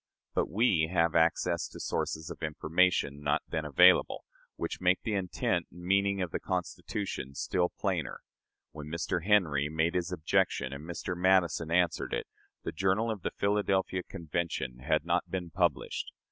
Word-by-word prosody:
But - - 0
we 95 -6 +3
have 85 -2 +2
access 85 +1 +2
to - - -11
sources 80 +2 -3
of 85 - -9
information, 80 -1 +1
not 75 0 +1
then 80 -1 -3
available, 75 -3 +5 0.3
which - - -4
make 90 0 +2
the 110 - -1
intent 90 -3 -1
and 90 +1 -12
meaning 100 +1 +2
of 90 - -5
the - - -2
Constitution 90 -4 -4
still 90 +5 0
plainer. 90 -8 -3 0.5
When 75 -1 -8
Mr. 85 +1 -2
Henry 80 -9 +3
made 80 +2 +1
his 90 0 -1
objection, 80 -5 0
and 75 +4 -8
Mr. 85 +1 -4
Madison 90 -3 +2
answered 85 0 +1
it, - - -3 0.4
the - - -3
journal 95 +6 +1
of 105 -4 -5
the - - -1
Philadelphia 100 -2 0
Convention 85 -8 -4
had 65 - 0
not - - 0
been 90 -3 -4
published. 85 -4 -1
85 Hz, 160 wpm, -30 LUFS, 80-95 Hz, 0.5 s, available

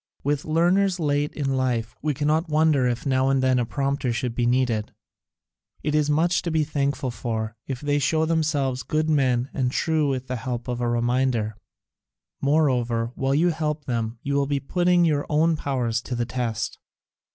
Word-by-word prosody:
With 145 0 -1
learners 180 +4 +2
late 145 -1 0
in 135 -3 -1
life, 120 -4 -1
we 150 -1 -1
cannot 155 +4 +1
wonder 155 -4 +3
if 120 +2 -2
now 130 -1 +2
and 135 -1 +2
then 130 -1 +3
a 120 - -1
prompter 140 -1 -1
should 120 0 -2
be 120 0 0
needed: 120 -4 0 0.9
it 150 - -1
is 150 -1 +2
much 170 +4 +2
to 170 - -3
be 160 -1 +2
thankful 140 -2 -1
for 110 -2 -3
if 130 -2 -4
they 145 0 +1
show 160 +3 +2
themselves 150 -5 0
good 155 +3 0
men 130 -3 +1
and 130 -3 0
true 155 0 +1
with 130 -1 -2
the 130 -1 -3
help 120 0 -4
of 125 -1 -3
a 120 - 0
reminder. 120 -2 0 0.9
Moreover, 125 -6 +1
while 135 +1 0
you 170 +4 +3
help 155 -2 -2
them 115 -2 -2
you 140 - -2
will 140 0 +1
be 140 -1 0
putting 175 +4 +2
your 150 -3 +1
own 160 +2 +3
powers 125 -6 -1
to 125 - -5
the 120 0 -1
test. 115 -3 -3
135 Hz, 185 wpm, -24 LUFS, 125-155 Hz, 0.9 s, wonder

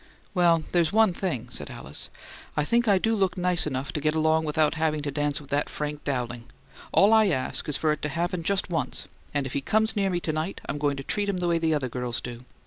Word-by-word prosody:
"Well, 170 -3 +4
there's 170 -3 +3
one 220 -3 +4
thing," 130 - -3
said - - -2
Alice. - - -6 0.5
"I 150 - +2
think 235 +6 +2
I 200 -2 +5
do 225 +4 +1
look 190 -2 +1
nice 180 -3 +2
enough 135 -1 -3
to 150 - -2
get 155 +1 +1
along 160 0 +3
without 150 0 +2
having 155 -2 0
to 145 - -2
dance 145 +1 0
with 140 -2 -14
that 145 +1 +1
Frank 150 0 -4
Dowling! 120 -4 -3 0.5
All 205 +3 +6
I 220 -1 +6
ask 135 -3 -1
is 145 - +1
for 155 - +2
it 150 - -2
to 145 - -1
happen 170 +3 -1
just 190 +1 0
once; 165 - -2 0.2
and 145 -2 -1
if 135 - -5
he 140 - 0
comes 220 +8 +2
near 200 -2 +2
me 175 -2 0
to 155 - -2
night 155 +5 -2
I'm 145 - -3
going 145 -1 0
to 135 - -5
treat 205 +7 0
him 195 - 0
the 180 -1 -1
way 170 -1 +2
the 160 -1 +2
other 140 -3 -1
girls 125 -1 -3
do. 120 0 -7
155 Hz, 250 wpm, -26 LUFS, 145-180 Hz, 0.5 s, All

